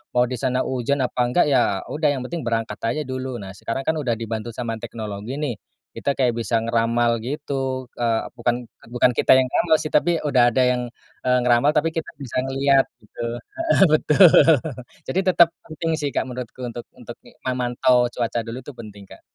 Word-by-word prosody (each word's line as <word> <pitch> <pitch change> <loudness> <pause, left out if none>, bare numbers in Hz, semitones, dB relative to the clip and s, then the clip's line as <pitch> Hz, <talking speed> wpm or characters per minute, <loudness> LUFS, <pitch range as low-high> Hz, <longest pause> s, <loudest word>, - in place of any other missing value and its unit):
Mau 125 - +5
di 125 - -3
sana 130 -1 0
hujan, 130 +2 -1
apa 125 - -3
enggak 150 +8 +3
ya 100 -7 +2
udah, 150 0 0
yang 130 - -4
penting 170 - -3
berangkat 115 -1 -2
aja 155 +5 -1
dulu. 130 -1 -5
Nah, 95 -1 -8
sekarang 115 +7 -3
kan 160 +3 0
udah 125 -5 0
dibantu 115 0 -5
sama 115 -2 -3
teknologi 105 +1 -6
nih. 125 -8 -2 0.4
Kita 140 - -1
kayak 125 -4 +1
bisa 115 0 0
ngeramal 115 +1 +1
gitu, 135 -1 -3
eee, 115 -2 0
bukan, 120 0 -2
eee, - - -22
bukan 125 0 +3
kita - - +3
yang 130 0 +6
ngeramal 160 +5 +2
sih, 155 - -3
tapi 170 +2 +2
udah 120 -3 +4
ada 130 - 0
yang, 125 0 +1 0.4
eee, 125 0 +3
ngeramal, 125 +4 +3
tapi 150 +1 +1
kita 165 - -4
bisa 135 -4 -8
ngelihat, 135 0 +3 0.2
gitu 110 +2 -9 0.2
heeh, 330 - -1
betul. 155 +4 +5 0.8
Jadi 185 - 0
tetep 175 -3 +5
penting 165 +1 -4
sih, 145 -2 -3
Kak, 130 - -1
menurutku 125 0 -6
untuk 120 0 -7 0.2
untuk, 120 0 -9 0.3
memantau 125 -1 +2
cuaca 120 -1 -2
dulu, 115 +3 -6
itu 130 +1 -11
penting, 105 -4 -11
Kak. - - -14
125 Hz, 190 wpm, -22 LUFS, 115-140 Hz, 0.8 s, yang